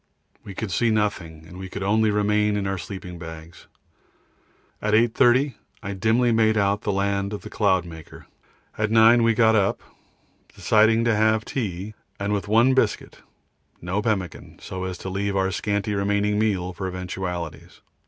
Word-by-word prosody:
We 100 - -9
could 110 -1 -4
see 115 +6 +1
nothing, 95 -7 -2
and 90 +3 -11
we 95 0 -7
could 100 +1 -5
only 110 +2 +2
remain 105 0 +1
in 100 - -2
our 95 -1 -2
sleeping 90 -2 -8
bags. 80 0 -11 1.1
At 105 0 +1
8.30 120 +4 +3 0.3
I 100 0 -4
dimly 115 +5 +2
made 110 -1 +3
out 100 0 +1
the 105 - -1
land 100 +1 -1
of 105 - -5
the - - -10
Cloudmaker. 90 -6 -2 0.5
At 110 0 +1
9 115 +2 +6
we 115 -1 +3
got 110 0 +4
up, 100 -2 +1 0.7
deciding 110 +1 +3
to 115 -2 +2
have 110 +1 +2
tea, 105 -4 -4 0.3
and 100 +1 -1
with 100 0 -2
one 115 +5 +4
biscuit, 120 -5 -1 0.6
no 90 +5 -2
pemmican, 100 -7 -3
so 95 0 -6
as 95 -1 -5
to 95 - -7
leave 100 +1 -2
our 95 0 +1
scanty 105 +3 -2
remaining 105 +1 0
meal 95 -4 0
for 95 +2 -5
eventualities. 90 -2 -6
100 Hz, 165 wpm, -23 LUFS, 95-110 Hz, 1.1 s, 9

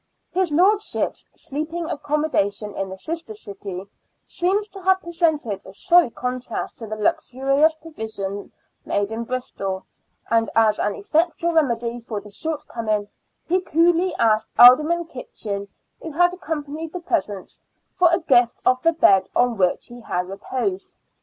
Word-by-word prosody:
His 365 -3 0
lordship's 400 +7 +1
sleeping 315 +4 -4
accommodation 285 - -1
in 195 -1 -3
the 190 - -7
sister 320 - -5
city 200 -2 -7 0.4
seems 390 +4 0
to 390 0 -10
have 380 +1 +3
presented 320 - -1
a 190 - -11
sorry 350 - +4
contrast 250 0 -4
to 225 - -7
the 215 - -4
luxurious 275 +8 +2
provision 220 -11 -6 0.3
made 205 +1 -1
in 230 +1 -3
Bristol, 195 -6 -4 0.4
and 225 0 +2
as 220 -2 +4
an 205 - 0
effectual 340 -2 0
remedy 240 -6 +1
for 225 -2 -5
the 210 - -13
shortcoming, 225 -7 -3 0.4
he 365 +2 +2
coolly 345 +2 +2
asked 215 -1 +2
Alderman 305 +8 +7
Kitchin, 205 -8 -6 0.3
who 325 - -6
had 350 +3 +3
accompanied 320 -3 -5
the 360 - -4
presents, 210 - -3 0.3
for 355 -1 +4
a 335 +2 +2
gift 245 -6 +3
of 255 0 +3
the 330 +3 +3
bed 195 - +4
on 245 -1 +3
which 185 -3 +1
he 240 0 -12
had 180 -5 -2
reposed. 260 - -4
260 Hz, 145 wpm, -22 LUFS, 215-335 Hz, 0.4 s, Alderman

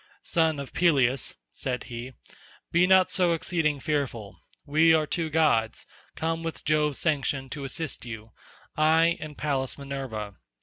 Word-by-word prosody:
"Son 160 -3 +2
of 140 - -7
Peleus," 135 -7 +2 0.2
said 125 -2 -3
he, 120 +2 -7 0.6
"be 175 +2 +4
not 190 -1 +5
so 180 -3 +3
exceeding 160 -3 0
fearful; 120 - -3 0.3
we 160 +2 +5
are 155 -1 +2
two 160 +2 -2
gods, 145 -8 +2 0.3
come 165 +1 -2
with 165 -1 -5
Jove's 150 -2 +2
sanction 140 -4 0
to 140 -2 -5
assist 145 +2 -4
you, 110 -2 -8 0.4
I, 160 +2 +4
and 150 -2 -8
Pallas 135 -4 -1
Minerva. 135 -7 -5
150 Hz, 140 wpm, -27 LUFS, 130-160 Hz, 0.6 s, not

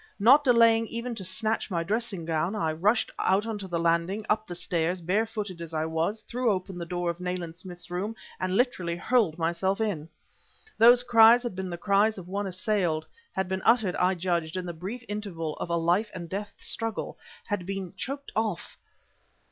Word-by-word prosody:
Not 260 +8 +6
delaying 230 -3 +5
even 235 +2 -4
to 215 -4 -5
snatch 215 +5 -1
my 170 -3 -1
dressing 205 -2 -2
gown, 165 +5 0
I 160 -7 0
rushed 200 +9 +1
out 195 +3 +2
on 220 -2 -3
to 195 - -6
the 175 -2 -2
landing, 170 +5 +1
up 215 0 +1
the 175 - -5
stairs, 175 +1 0
bare 195 +7 +1
footed 205 -6 -5
as 165 -1 -6
I 155 0 0
was, 160 +7 -1
threw 240 +3 -1
open 185 -2 -2
the 170 - -5
door 175 0 -1
of 170 - -10 0.4
Smith's 175 -1 -9
room 200 +5 -3 0.2
and 185 +1 0
literally 185 -9 +1
hurled 205 -3 +1
myself 175 +4 0
in. 180 -8 -2 0.7
Those 240 +2 +8
cries 235 0 +7
had 240 -6 -4
been 190 0 -4
the 175 - -4
cries 205 +4 +2
of 180 -2 -8
one 200 +2 -2
assailed, 185 -4 0 0.3
had 190 -1 0
been 190 0 -2
uttered, 220 -5 +3
I 185 +1 +2
judged, 170 -1 -1
in 185 - -3
the 175 - -4
brief 195 +9 -6
interval 185 -7 -4
of - - -5
a 170 - +1
life 175 +6 +2
and 170 -2 -6
death 200 +4 -5
struggle; 225 -1 -4 0.3
had 195 -4 -2
been 195 -2 -4
choked 275 +5 -5
off... 215 -5 -2
190 Hz, 195 wpm, -27 LUFS, 170-220 Hz, 0.7 s, Those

